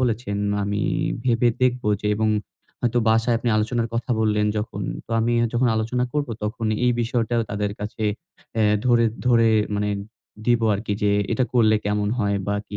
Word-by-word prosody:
বলেছেন। 115 Hz, -4 st, -1 dB, 0.3 s
আমি 100 Hz, +1 st, -1 dB, 0.4 s
ভেবে 120 Hz, -1 st, +3 dB
দেখব, 125 Hz, 0 st, +2 dB, 0.2 s
যে -, -, -2 dB
এবং 110 Hz, 0 st, +1 dB, 0.5 s
হয়তো 120 Hz, 0 st, +1 dB
বাসায় 115 Hz, +1 st, +3 dB
আপনি 120 Hz, +1 st, -2 dB
আলোচনার 115 Hz, +2 st, 0 dB
কথা 120 Hz, +2 st, -3 dB
বললেন 105 Hz, -1 st, +2 dB
যখন। 105 Hz, -1 st, -3 dB, 0.2 s
তো -, -, -17 dB
আমি 115 Hz, +1 st, +1 dB, 0.2 s
যখন 120 Hz, +1 st, +2 dB
আলোচনা 115 Hz, +3 st, 0 dB
করব 145 Hz, -2 st, -1 dB
তখন 110 Hz, +2 st, -2 dB, 0.2 s
এই 125 Hz, -, +4 dB
বিষয়টাও 115 Hz, 0 st, 0 dB
তাদের 105 Hz, 0 st, -1 dB
কাছে 105 Hz, +1 st, -5 dB, 0.5 s
অ্যা 110 Hz, -1 st, +2 dB, 0.2 s
ধরে, 120 Hz, -1 st, +4 dB, 0.2 s
ধরে 115 Hz, -2 st, +5 dB, 0.3 s
মানে 105 Hz, 0 st, 0 dB, 0.6 s
দিব 120 Hz, -1 st, +3 dB
আরকি 105 Hz, +1 st, -3 dB
যে 105 Hz, -, +3 dB, 0.2 s
এটা 130 Hz, -, +2 dB
করলে 110 Hz, -3 st, +4 dB
কেমন 105 Hz, 0 st, 0 dB
হয়? 100 Hz, -3 st, +1 dB
বা 100 Hz, -, 0 dB
কি? 105 Hz, -, -5 dB
115 Hz, 170 wpm, -23 LUFS, 105-120 Hz, 0.6 s, ধরে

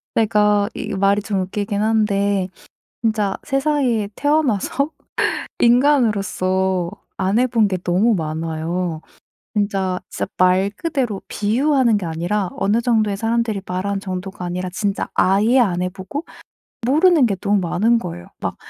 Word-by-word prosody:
제가 210 Hz, -2 st, +3 dB
이 -, -, -5 dB
말이 200 Hz, +1 st, +2 dB
좀 200 Hz, -2 st, -1 dB
웃기긴 205 Hz, +2 st, -2 dB
한데 200 Hz, -3 st, +1 dB, 0.5 s
진짜 215 Hz, -3 st, 0 dB
세상에 270 Hz, -6 st, 0 dB
태어나서 290 Hz, -1 st, +1 dB, 0.7 s
인간으로서 200 Hz, -8 st, +2 dB, 0.3 s
안 195 Hz, +3 st, +1 dB
해본 235 Hz, -4 st, +3 dB
게 185 Hz, -2 st, -1 dB
너무 200 Hz, +6 st, +2 dB
많아요. 160 Hz, +1 st, -3 dB, 0.5 s
진짜, 195 Hz, -3 st, 0 dB
진짜 -, -, -3 dB
말 185 Hz, +2 st, +3 dB
그대로 260 Hz, -11 st, -2 dB
비유하는 240 Hz, +2 st, +2 dB
게 195 Hz, -, -4 dB
아니라 175 Hz, +4 st, -1 dB
어느 210 Hz, +4 st, +1 dB
정도의 215 Hz, -4 st, +1 dB
사람들이 225 Hz, -2 st, 0 dB
말한 195 Hz, +2 st, -2 dB
정도가 185 Hz, -1 st, -5 dB
아니라 180 Hz, +1 st, -3 dB
진짜 200 Hz, +1 st, -2 dB
아예 215 Hz, +7 st, +4 dB
안 180 Hz, -6 st, +2 dB
해보고 190 Hz, -, -4 dB, 0.6 s
모르는 315 Hz, 0 st, +5 dB
게 200 Hz, -4 st, 0 dB
너무 200 Hz, +2 st, +1 dB
많은 210 Hz, +7 st, +2 dB
거예요. 85 Hz, -, -7 dB
막 -, -, -3 dB
205 Hz, 280 characters per minute, -20 LUFS, 185-230 Hz, 0.7 s, 모르는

